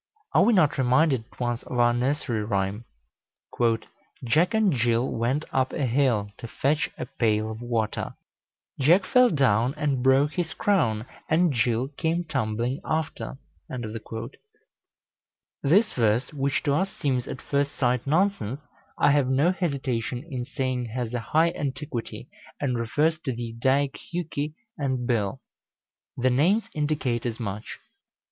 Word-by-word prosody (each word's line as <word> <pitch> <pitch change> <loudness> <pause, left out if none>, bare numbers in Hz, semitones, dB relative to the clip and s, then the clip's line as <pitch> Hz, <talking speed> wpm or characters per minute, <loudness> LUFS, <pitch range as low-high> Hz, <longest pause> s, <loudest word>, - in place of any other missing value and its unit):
Are - - +6
we 235 - +5
not 165 -9 +3
reminded 130 -1 +3
at - - -21
once 120 -1 -1
of 125 - -6
our 120 0 +4
nursery 125 -2 0
rhyme 100 +1 -1 1.4
"Jack 155 - +2
and 215 -5 +3
Jill 120 0 +2
went 125 +6 0
up 130 -1 +1
a 145 - 0
hill 120 -5 +1
To 115 - -6
fetch 145 +6 0
a - - -4
pail 110 -1 0
of 110 +1 -7
water; 115 -3 -2 0.6
Jack 170 +8 +5
fell 250 -1 +5
down, 130 - +2
and 145 -4 0
broke 135 +3 +4
his 175 -2 -2
crown, 140 - +1 0.2
And 165 0 +3
Jill 120 +1 +1
came 160 +4 -1
tumbling 125 -2 -2
after"? 155 - -3 2.2
This 190 +10 +3
verse, 115 +4 +1
which 140 -1 0
to 145 - +1
us 190 +6 +1
seems 130 -4 -1
at - - -5
first 140 0 -1
sight 125 0 0
nonsense, 150 - 0 0.3
I - - +4
have 140 -2 +3
no 140 +7 +3
hesitation 135 -9 -2
in 130 -6 -4
saying 130 -2 -2
has 120 0 -4
a 120 - 0
high 160 +9 +2
antiquity, 140 -5 -5 0.3
and 130 -4 0
refers 150 +8 +1
to 145 -5 -3
the 115 -1 -5
Eddaic 135 +3 +1
Hjuki 155 -3 -3 0.2
and 130 -3 -1
Bil. 105 -5 0 0.8
The 130 +1 +2
names 175 - +2
indicate 145 -6 -1
as 115 0 -4
much. 105 -2 -5
130 Hz, 145 wpm, -26 LUFS, 120-150 Hz, 2.2 s, Are